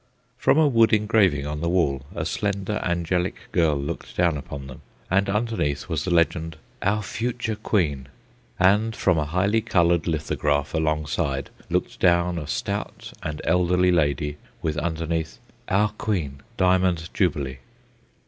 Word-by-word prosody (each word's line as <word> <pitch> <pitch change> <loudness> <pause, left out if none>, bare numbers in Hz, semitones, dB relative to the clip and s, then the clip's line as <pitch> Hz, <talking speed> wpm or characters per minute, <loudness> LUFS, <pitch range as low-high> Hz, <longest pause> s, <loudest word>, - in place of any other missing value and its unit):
From - - +3
a 160 -1 +5
wood 115 -4 +4
engraving 105 -9 +3
on 75 0 -4
the 85 - 0
wall 70 -7 +1
a - - -2
slender, 100 0 -2
angelic 85 +1 -1
girl 80 -4 +3
looked 70 +1 -5
down 85 -3 +3
upon 70 -1 -7
them, 65 -1 -10 0.3
and 100 +1 +3
underneath 105 - -1
was 80 -5 -2
the - - -1
legend: 85 -1 +1 0.2
"Our 105 +2 +1
Future 115 0 -2
Queen." 80 - 0 0.5
And 105 +4 +3
from 90 -4 +2
a 75 - 0
highly 95 +8 +1
coloured 85 -7 +2
lithograph 75 -2 0
alongside 75 -3 -1 0.2
looked - - -1
down 85 -1 +3
a 75 - -7
stout - - -4
and 75 -1 -4
elderly 90 0 +3
lady, 75 -2 +1 0.3
with 80 -2 0
underneath: 80 -1 -2 0.3
"Our 105 +2 +3
Queen—Diamond 90 -2 0
Jubilee." 70 -8 0
85 Hz, 140 wpm, -24 LUFS, 75-100 Hz, 0.5 s, a